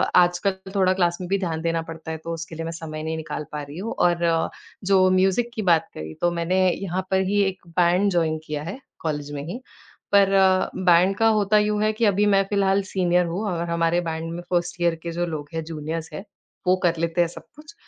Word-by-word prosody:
आजकल 190 +2 +2
थोड़ा 190 -2 +3
क्लास 175 -2 +1
में 180 - -4
भी 195 - +2
ध्यान 165 -4 -2
देना 165 0 0
पड़ता 160 0 -8
है 160 - -4
तो 165 - -4
उसके 165 0 -7
लिए 165 - -4
मैं 165 - -3
समय 155 -2 -6
नहीं 160 0 -2
निकाल 160 -1 -5
पा 150 - -4
रही 145 +2 -10
हूँ। 225 +4 -4
और 175 -1 +2
अ, 165 -1 +2 0.3
जो 190 -1 +4
म्यूज़िक 190 +5 +2
की 220 - -2
बात 165 -1 +4
करी 80 0 -7
तो 175 - +3
मैंने 170 +2 0
यहाँ 185 0 -3
पर 190 0 +3
ही 205 0 +2
एक 190 -2 -3
बैंड 175 +3 +2
जॉइन 165 -3 +1
किया 150 -1 -4
है 195 - -6 0.2
कॉलेज 145 -2 -3
में 140 -1 -4
ही। 220 +9 -5 0.5
पर 200 -1 +5
अ, 190 -1 +4
बैंड 185 +1 +4
का 225 - +4
होता 205 +1 +3
यूँ 210 0 +1
है 215 - +3
कि 225 +2 +1
अभी 205 0 +3
मैं 195 - +4
फिलहाल 195 -1 +2
सीनियर 180 -1 +2
हूँ 175 +5 -3
और 170 -1 -3
हमारे 170 +1 +1
बैंड 165 -1 -4
में 175 - -5
1st 175 0 -1
ईयर 170 -1 +2
के 170 - -4
जो 175 +1 -1
लोग 150 -3 -5
हैं 165 0 -2
जूनियर्स 160 +1 -5
हैं, 195 - -6 0.4
वो 185 - +5
कर 170 -1 +2
लेते 170 +1 +1
हैं 170 - +3
सब 165 - -11
कुछ। 300 +5 -14
175 Hz, 235 wpm, -23 LUFS, 165-190 Hz, 0.5 s, पर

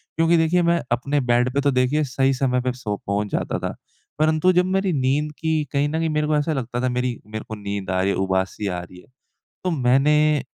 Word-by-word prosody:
क्योंकि 165 +1 +3
देखिए 165 +2 +3
मैं 170 0 +2
अपने 140 +4 0
बेड 120 +1 +3
पे 140 - +1
तो 140 0 +2
देखिए 130 +4 +2
सही 135 0 +1
समय 125 -1 0
पे 125 0 -1
सो 105 -5 -4
पहुँच 100 +1 0
जाता - - -2
था। - - -4 0.4
परंतु, 155 +3 +3
तो - - +5
जब 180 +1 +3
मेरी 190 -1 0
नींद 140 +3 0
की 160 -1 0
कहीं 145 +1 +1
न 160 +1 -2
कहीं 165 -1 0
मेरे 150 0 0
को 155 - +1
ऐसा 155 +2 0
लगता 120 -2 -3
था 130 - +2
मेरी 125 -1 -2
मेरे 110 0 -6
को 110 - -4
नींद 100 -2 -5
आ 95 0 +1
रही 95 - +1
है - - -1
उबासी 95 +2 -1
आ 90 -2 -2
रही 90 +1 -13
है। - - -23 0.6
तो 180 - +1
मैंने 150 +2 +3
135 Hz, 240 wpm, -22 LUFS, 120-155 Hz, 0.6 s, तो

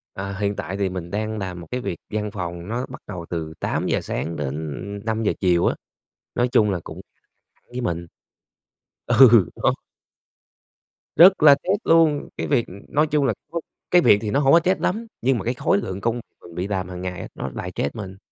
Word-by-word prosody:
À, 95 0 -5
hiện 100 0 0
tại 95 0 -4
thì 100 -1 0
mình 90 -2 -6
đang 110 +1 -2
làm 95 -3 -5
một 85 - -11
cái 125 0 -2
việc 85 - -4
văn 105 -1 -3
phòng 85 -3 -5
nó 120 +4 -2
bắt 130 - -9
đầu 90 -5 -6
từ 80 -2 -4
8:00 - - -1
sáng 85 - -3
đến 70 -3 -3 0.5
5:00 110 -1 0
chiều 90 -3 +3
á, - - +2 0.6
nói 120 +1 +2
chung 105 -3 +4
là 90 - -1
cũng - - -9 0.7
với 125 +1 -4
mình. 85 -7 -2 1.0
Ừ 120 -6 +7
nó - - +2 1.4
rất 185 -1 +7
là 145 -2 +9
stress 190 +8 -1
luôn, 160 -3 +4
cái - - -2
việc, 130 -5 +1
ừm 95 - -11
nói 150 +2 +2
chung 150 -2 +1
là 120 - +2 0.2
nó 170 - -1 0.3
cái 180 - +6
việc 100 - +6
thì 105 - -3
nó 140 - +2
hông 140 -1 +4
có 165 - +8
stress 185 +3 +1
lắm, 225 +5 -1
nhưng 130 +1 +2
mà 95 - -5
cái 120 - 0
khối 120 - +1
lượng 95 0 -4
công 115 +3 -1 0.2
mình 85 - -13
bị 90 +2 -2
làm 95 -2 -2
hàng 90 -1 -7
ngày 90 -1 -5
nó 65 - -4
lại - - -5
stress 70 - -2
mình. 95 -3 -7
105 Hz, 210 wpm, -23 LUFS, 90-130 Hz, 1.4 s, là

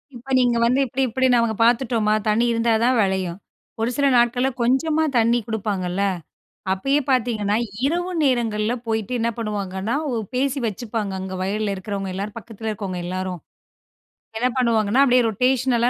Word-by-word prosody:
இப்ப 255 +3 -10
நீங்க 245 -2 +2
வந்து 250 +3 +2
இப்படி 260 +2 -3
இப்படி 260 +3 0
நாங்க 230 -2 +2
பார்த்துட்டோமா. 230 -2 +2
தண்ணி 215 +3 +3
இருந்தா 230 0 +1
தான் 255 +2 +3
வெளையும். 190 -3 -1 0.5
ஒரு 230 - +1
சில 280 +1 +1
நாட்கள்ல, 245 +2 +3
கொஞ்சமா 300 +6 +2
தண்ணி 235 +1 +3
குடுப்பாங்கல்ல, 200 -4 -2 0.7
அப்பயே 275 +10 +1
பார்த்தீங்கன்னா, 220 -5 +1 0.3
இரவு 350 +4 -1
நேரங்கள்ல 230 -4 +1
போயிட்டு 220 +1 -2
என்ன 230 +1 +1
பண்ணுவாங்கன்னா, 205 -1 -3 0.2
ஒ - - -1 0.2
பேசி 275 +2 0
வச்சுப்பாங்க 215 -1 -3
அங்க 190 0 -5
வயல்ல 205 +1 -1
இருக்கிறவங்க 195 0 -4
எல்லாரும், 200 +3 -5
பக்கத்தில 225 -1 -6
இருக்கவங்க 195 -4 -4
எல்லாரும். 185 -1 -4 1.0
என்ன 250 +2 +2
பண்ணுவாங்கன்னா, 230 0 +3
அப்டியே 250 -1 +4
ரொட்டேஷனல் 250 +1 +1
230 Hz, 145 wpm, -22 LUFS, 205-250 Hz, 1.0 s, அப்டியே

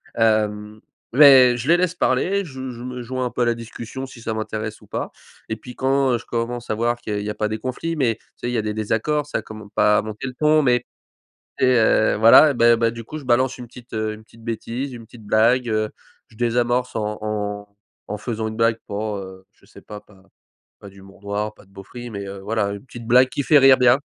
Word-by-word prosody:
Hem, 105 -1 0 0.3
mais 130 -3 +8
je 120 +2 -5
les 170 - +6
laisse 180 -1 0
parler. 200 +2 +1
Je 130 -4 -7
je 120 0 -9
me 125 0 -6
joins 130 +2 -3
un 125 - -3
peu - - -3
à - - +2
la 120 - +2
discussion 115 +3 -7
si 130 - -13
ça 110 - -3
m'intéresse 110 0 -5
ou - - -18
pas - - -4 0.4
et 110 - -1
puis 125 +3 -12
quand, 135 -1 +1
heu, - - +2
je 115 - -12
commence 120 0 -4
à 110 - 0
voir 120 +2 0
qu'il 115 -3 -6
y - - -1
a - - -1
il 105 - -5
y - - -3
a 105 - -4
pas 105 - -1
des 110 - -3
conflits, 130 +8 -4
mais 125 -7 +1
tu - - -32 0.2
sais 120 - -4
il - - -3
y - - 0
a - - +1
des 105 - -2
désaccords, 110 +8 -1
ça - - -2
commence 110 -2 -11
pas 105 0 +4
à - - -1
monter 110 +3 -7
le 130 - -6
ton, 155 0 +4
mais, 125 -2 +3 0.8
tu - - +2
sais, 130 - +4
heu, 110 -1 +3
voilà, 115 +7 +7
bah 120 -1 +4
bah 115 0 +2
du 115 0 -8
coup, 155 - -8
je 140 - -13
balance 130 +1 +2
une 125 -1 -9
petite, 125 +1 -15
heu, 110 -1 -2
une 110 - -12
petite 115 +1 -19
bêtise, 120 +4 -4
une 120 -2 -9
petite 115 -1 -15
blague, 120 +4 +3
heu, 110 -1 0 0.4
je 110 - -21
désamorce 120 +1 0
en 105 -1 -2
en 105 -1 -4 0.3
en 105 - -4
faisant 110 0 -4
une 110 - -7
blague 115 0 +2
pour, 105 +1 -3
heu, 95 -1 -10
je 100 - -27
sais 105 - -16
pas, 105 -1 -9
pas 95 -2 -22 0.6
pas 100 - -12
d'humour 95 0 -17
noir, 105 +1 -3
pas - - -19
de 95 - -27
beauferie 120 +5 -10
mais 100 -1 -6
heu, 100 0 -7
voilà 105 0 -1
une 100 +4 -8
petite 120 -3 -10
blague 125 +2 +6
qui 140 - -3
fait 150 - +5
rire 135 -1 +7
bien 125 +2 +4
115 Hz, 255 wpm, -21 LUFS, 105-125 Hz, 0.8 s, mais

